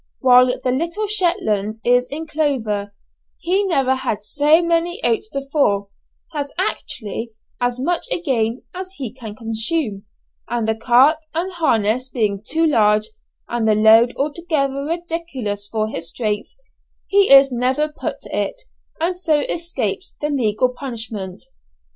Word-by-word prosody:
While 250 -1 +6 0.2
the 255 - +1
little 335 +10 -1
Shetlander 335 - 0
is 245 +1 +4
in 310 +4 -5
clover; 250 -10 -1 0.5
he 375 +4 +1
never 270 -7 +2
had 230 -6 -3
so 295 +8 +4
many 340 +3 0
oats 435 -1 +1
before 275 -8 0 0.4
has 285 -2 -3
actually 225 +1 -3 0.3
as 245 0 0
much 345 - -1
again 250 - 0
as 370 +1 -7
he 260 - -6
can 225 -5 -9
consume 225 0 -2 0.4
and 235 -2 -1
the 220 - +1
cart 255 +7 +4 0.2
and 355 +3 -1
harness 255 -6 +1
being 210 -6 -1
too 320 +8 +1
large, 215 -7 +3 0.4
and 235 -2 -1
the 215 - +4
load 220 +3 +6
altogether 280 -2 -1
ridiculous 315 -11 -4
for 215 0 -1
his 165 -6 -4
strength, 210 0 -2 0.6
he 400 0 +3
is 275 0 +8
never 255 +5 +1
put - - -4
to - - -7
it, - - -2 0.4
and 355 +2 -1
so 310 -5 +2
escapes 280 - -3
the 295 - -1
legal 250 -2 +1
punishment. 220 -8 -5
260 Hz, 140 wpm, -20 LUFS, 220-320 Hz, 0.6 s, is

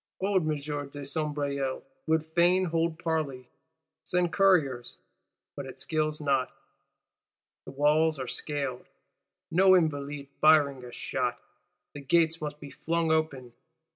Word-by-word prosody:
Old 195 -1 +2
M. 155 - +1
de 145 -1 -6
Sombreuil 140 -2 -2 0.2
would 160 0 +2
fain 175 +3 +3
hold 165 -1 0
parley, 155 -7 -2 0.6
send 180 -1 0
Couriers; 155 -11 +2 0.6
but 140 -2 -6
it 130 - -10
skills 155 -1 -1
not: 135 -3 0 1.1
the - - -8
walls 150 +3 +2
are 130 - -3
scaled, 135 0 -4 0.6
no 185 +3 +6
Invalide 145 -3 -2
firing 145 -4 +4
a 125 - -9
shot; - - -2 0.5
the 145 - -8
gates 165 +3 +2
must 150 -1 -5
be 145 -2 -10
flung 165 0 -1
open. 140 -6 -1
150 Hz, 125 wpm, -28 LUFS, 140-165 Hz, 1.1 s, no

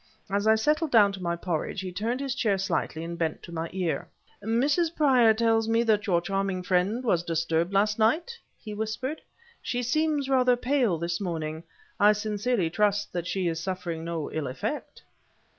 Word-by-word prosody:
As 200 +2 0
I 220 - +6
settled 300 +8 +1
down 210 -6 +5
to 195 -1 -8
my 170 -1 -1
porridge, 170 +2 -3
he 185 -1 -5
turned 225 +8 -2
his 275 -2 -2
chair 220 -7 +1
slightly 185 -4 -2
and 170 0 -6
bent 160 -2 -2
to - - -10
my 165 0 -4
ear. 180 -3 -2 0.4
"Mrs. 285 - +1
Prior 255 -7 +5
tells 225 0 +2
me 230 +1 +3
that 215 -3 +1
your 175 -3 +3
charming 195 0 -2
friend 190 +6 +1
was 180 -8 +2
disturbed 165 +1 0
last 210 +2 +2
night," 315 - +2 0.2
he 215 - -8
whispered. 220 +8 -3 0.4
"She 245 0 -2
seems 295 +2 +1
rather 255 -2 +4
pale 245 -7 +1
this 170 +3 -3
morning; 160 -3 -3 0.4
I 210 +1 +6
sincerely 210 -3 -1
trust 205 +1 +1
that 175 -1 -3
she 185 -2 -1
is 165 -1 -1
suffering 175 -2 -4
no 165 -2 -4
ill 155 -3 -3
effect." 130 +1 -5
205 Hz, 180 wpm, -27 LUFS, 170-240 Hz, 0.4 s, I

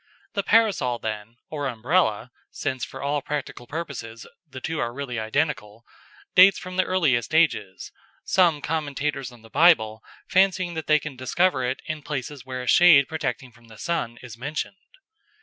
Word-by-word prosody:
The 200 - 0
Parasol, 200 - +2
then, 110 +1 -6
or 145 -2 -2
Umbrella 125 - 0 0.2
since 130 -3 -4
for 120 - -6
all 145 +1 0
practical 140 -4 -5
purposes 125 -8 -6 0.2
the 130 - -8
two 160 +4 -3
are 120 - -1
really 125 -2 -5
identical 110 -2 -2 0.5
dates 190 +1 +7
from 185 0 -8
the 185 - +3
earliest 155 -7 +1
ages, 105 - +1 0.3
some 170 -6 +2
commentators 145 -3 -2
on 120 -2 -17
the 115 - -15
Bible 110 -11 +4 0.3
fancying 185 -2 +2
they 155 -1 +2
can 150 -2 -6
discover 130 +3 +1
it 130 - -5
in 155 -1 -4
places 145 -1 -5
where 130 -1 -5
a - - -9
shade 155 -5 +7
protecting 135 -5 -4
from 120 0 -21
the 110 -1 -14
sun 155 -9 -3
is 115 -2 -10
mentioned. 150 +8 -5
140 Hz, 160 wpm, -24 LUFS, 120-165 Hz, 0.5 s, dates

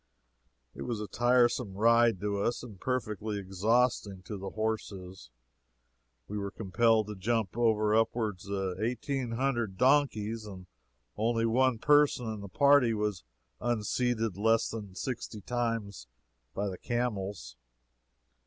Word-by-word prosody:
It - - -10
was 120 -3 -3
a 105 - -3
tiresome 120 -2 +2
ride 115 -1 +4
to 100 -1 -1
us, 120 +3 -1
and 105 -7 -10
perfectly 110 -4 -2
exhausting 100 0 0
to 105 - -6
the 95 0 -5
horses. 100 - -4 1.0
We 105 - -4
were 100 0 -3
compelled 110 +2 +2
to 105 0 -7
jump 110 +1 -1
over 110 -3 +2
upwards 110 -3 0
of 95 -2 -2
eighteen 125 +2 -2
hundred 120 -6 -1
donkeys, 115 -5 +2
and 95 -3 -9 0.5
only 115 +1 +1
one 125 +1 +3
person 145 -1 +3
in 105 - -7
the 100 - -8
party 140 -3 +4
was 105 -7 -2 0.4
unseated 115 -2 -1
less 115 +2 +2
than 105 -4 -7
sixty 115 -2 -5
times 115 - -3 0.5
by 100 +1 -1
the 95 -2 -5
camels. 100 - -3
110 Hz, 130 wpm, -30 LUFS, 100-120 Hz, 1.0 s, ride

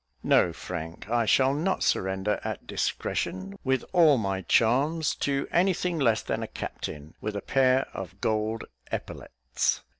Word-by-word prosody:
No, 90 - +4
Frank, 85 +1 -7
I 120 -1 +2
shall 135 +5 +4
not 170 +7 0
surrender 95 +2 0
at - - -4
discretion, 95 +1 -2
with 130 0 +1
all 160 -6 +6
my 95 -4 -1
charms, 135 - +2
to 140 -1 -1
any 185 +1 +3
thing 175 -2 -2
less 115 -6 +2
than - - -2
a - - -3
captain, 75 +2 -6
with 105 -1 -3
a 100 - -2
pair 130 0 +3
of 95 0 -7
gold 110 +1 -1 0.3
epaulettes." 65 0 -2
115 Hz, 150 wpm, -27 LUFS, 95-140 Hz, 0.3 s, all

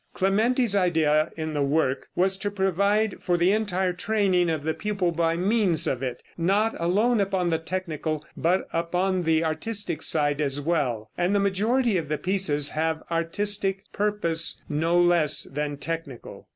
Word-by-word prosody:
Clementi's 220 +4 +2
idea 160 -4 +2
in 155 -1 -3
the 145 - -1
work 140 -2 0
was 190 +2 +2
to 205 - -2
provide 200 +2 +1
for 175 -1 +1
the 175 +2 +3
entire 190 -4 0
training 185 -2 +1
of 155 -3 -2
the 160 +1 0
pupil 200 -3 -1
by 165 0 0
means 190 -3 +1
of 130 - -1
it; 130 -2 -4 0.2
not 200 +6 +2
alone 205 +7 +2
upon 190 -3 0
the 160 - +1
technical, 160 -4 -4
but 180 +3 0
upon 180 +3 0
the 160 -1 +2
artistic 170 +1 -4
side 145 -1 +1
as 140 -1 -1
well, 130 -9 -1
and 180 +3 +1
the - - +3
majority 210 +3 +1
of 155 -3 -7
the 150 - 0
pieces 155 -7 0
have 160 0 -2
artistic 195 +4 -1
purpose 200 -6 0
no 165 +4 +1
less 175 -4 +3
than 145 0 -4
technical. 160 -5 -6
175 Hz, 160 wpm, -25 LUFS, 155-200 Hz, 0.2 s, the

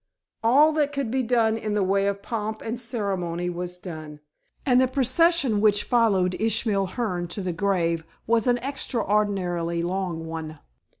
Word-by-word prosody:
All 280 +7 +6
that 300 -2 +1
could 275 -5 -2
be 260 +1 +1
done 230 -2 +2
in 215 -2 -3
the 205 - +2
way 195 +1 +2
of 200 0 -2
pomp 220 -1 -4
and 230 +2 -3
ceremony 190 -8 -2
was 180 +1 -5
done, 155 -4 -8 0.5
and 255 -1 +4
the 260 - +4
procession 265 -2 +2
which 205 -1 +3
followed 200 -7 +2
Ishmael 215 -3 +1
Hearne 180 -7 -1
to 185 +4 -5
the 180 -1 -2
grave 170 -3 0 0.2
was 230 +1 +2
an 245 0 +4
extraordinarily 200 -10 -1
long 175 -2 -2
one. 160 -1 -6
205 Hz, 160 wpm, -25 LUFS, 180-240 Hz, 0.5 s, All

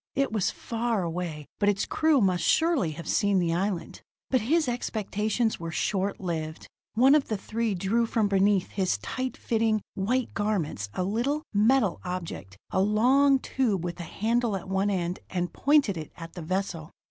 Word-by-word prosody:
It 275 -2 +1
was 210 -3 +1
far 230 -3 -2
away, 165 -3 -4
but 205 - +3
its 200 -1 +1
crew 315 -4 +2
must 180 -4 +2
surely 320 - +2
have 170 +2 -8
seen 200 -1 +2
the 170 -2 +1
island. 185 0 -2 0.3
But 255 - +3
his 310 +7 +2
expectations 220 -1 -1
were 165 0 -5
short 195 +4 -1
lived. 160 -4 -4 0.3
One 260 +5 +6
of 300 -2 +3
the 215 - -1
three 220 +1 -2
drew 220 +6 +1
from 225 -2 +1
beneath 195 -1 +2
his 190 -2 0
tight 260 0 -4
fitting, 225 -1 +1
white 240 +6 -1
garments 180 - -1
a 185 - 0
little, 240 +10 -1
metal 215 -1 +3
object, 170 - -6
a 190 - +2
long 255 +7 +4
tube, 235 -9 -1
with 175 0 -4
a 170 - -6
handle 230 0 0
at 190 0 -6
one 195 +2 +1
end, 180 -2 -1
and 175 -1 -2
pointed 280 - +3
it 155 -2 -7
at 165 -1 -9
the 175 - -7
vessel. 170 -2 -3
200 Hz, 175 wpm, -27 LUFS, 180-235 Hz, 0.3 s, One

